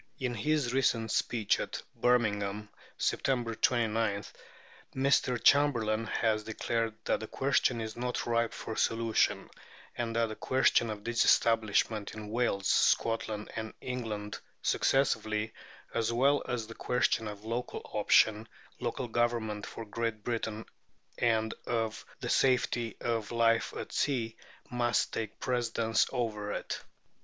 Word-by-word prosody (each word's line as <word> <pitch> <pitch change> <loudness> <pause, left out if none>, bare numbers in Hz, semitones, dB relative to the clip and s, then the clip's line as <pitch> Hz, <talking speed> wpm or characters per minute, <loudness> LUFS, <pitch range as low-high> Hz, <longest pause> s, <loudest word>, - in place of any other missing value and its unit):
In 125 -3 -2
his 145 0 0
recent 115 -4 +1
speech 110 -4 +1
at - - -4 0.2
Birmingham 105 -4 +1 0.3
(Sept. 120 -4 0
29), 110 -4 +1 0.7
Mr. 130 -2 +2
Chamberlain 115 -7 +4
has 110 -1 +1
declared 115 0 -2
that - - +1
the 110 - -6
question 135 -2 +1
is 110 -1 -4
not 125 +1 -2
ripe 115 -1 +1
for 110 - -6
solution, 115 -1 +1 0.5
and 115 -1 -3
that 115 -1 +2
the 110 - -5
question 130 -2 +2
of 105 -1 -5
disestablishment, 115 -2 +2
in 105 -1 -7
Wales, 110 -5 0
Scotland, 110 -2 +1
and 110 0 -5
England 110 -5 -4 0.2
successively, 110 -5 +1 0.4
as 115 0 0
well 135 +5 +3
as 120 -2 -1
the 115 - -9
questions 115 -2 0
of 105 +1 -9
Local 120 +2 -3
Option, 110 +1 +4 0.3
local 125 +1 -3
government 115 -3 -1
for 115 - -7
Great 110 0 -3
Britain, 115 -2 -3 0.5
and 110 -2 +2
of 115 -2 -1 0.2
the - - -3
safety 120 -3 +2
of 115 -3 -1
life 115 -1 +2
at - - -6
sea, 115 -6 0 0.4
must 120 -2 +1
take 110 -2 -4
precedence 115 -3 +1
of 115 -3 -1
it. 105 0 -4
115 Hz, 130 wpm, -31 LUFS, 110-120 Hz, 0.7 s, Chamberlain